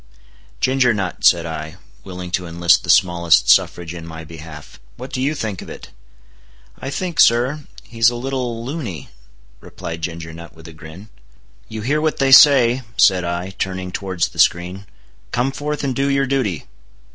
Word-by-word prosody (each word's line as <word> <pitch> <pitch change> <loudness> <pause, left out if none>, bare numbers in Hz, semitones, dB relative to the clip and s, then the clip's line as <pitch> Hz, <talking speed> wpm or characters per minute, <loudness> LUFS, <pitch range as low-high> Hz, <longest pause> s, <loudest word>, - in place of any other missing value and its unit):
"Ginger 130 -2 +2
Nut," 95 -4 -4
said 85 -1 +4
I, 80 0 -6 0.3
willing 90 -2 -8
to 90 0 -2
enlist 85 0 +2
the - - -9
smallest 85 -8 +3
suffrage 85 -1 +1
in 85 -1 -9
my 80 0 -9
behalf, 80 -3 -12 0.2
"what - - -9
do 130 - -2
you 145 +4 0
think 105 - -4
of - - -11
it?" - - -10 0.9
"I 135 - -5
think, 175 +2 -4
sir, 130 +5 +3 0.2
he's 115 0 +2
a 120 - -6
little 120 -2 -4
luny," 120 - -6 0.5
replied 85 +5 -8
Ginger 80 -1 -6
Nut 85 0 -12
with 80 0 -14
a 85 - -11
grin. 80 +6 -13 0.6
"You 110 -1 -6
hear 145 +7 0
what 155 0 0
they 135 -1 +1
say," 130 -3 +7 0.2
said 95 -2 +4
I, 85 +2 -4
turning 95 -1 -4
towards 95 -3 -2
the - - -12
screen, 90 +3 +1 0.4
"come 125 +3 0
forth 150 +2 -4
and 135 -2 -2
do 140 +2 0
your 140 0 +1
duty." 125 - -2
95 Hz, 170 wpm, -19 LUFS, 85-130 Hz, 0.9 s, say